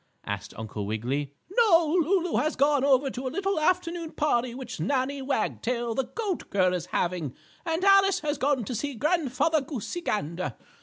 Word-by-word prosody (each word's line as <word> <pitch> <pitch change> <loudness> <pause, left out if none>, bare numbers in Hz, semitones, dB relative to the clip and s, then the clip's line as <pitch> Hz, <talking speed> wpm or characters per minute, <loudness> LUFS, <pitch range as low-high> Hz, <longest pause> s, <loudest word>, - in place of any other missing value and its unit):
asked 105 0 -5
Uncle 105 -2 -5
Wiggily. 130 +7 -2 0.2
"No, 345 -9 +5
Lulu 355 +1 +1
has 310 - +1
gone 285 0 +3
over 270 -1 +3
to 255 +2 -4
a - - 0
little 390 +3 -1
afternoon 335 0 0
party 250 -5 0
which 255 -2 -7
Nannie 275 0 0
Wagtail, 240 -2 -1
the 265 +2 0
goat 390 - -4
girl, 185 -2 +2
is 180 -1 -3
having, 170 -9 -1 0.3
and 325 +2 0
Alice 390 0 +5
has 300 -1 -2
gone 270 -4 +1
to 250 - -4
see 280 +4 -3
Grandfather 310 +2 +1
Goosey 280 - -5
Gander. 170 - -2
270 Hz, 165 wpm, -27 LUFS, 200-325 Hz, 0.3 s, No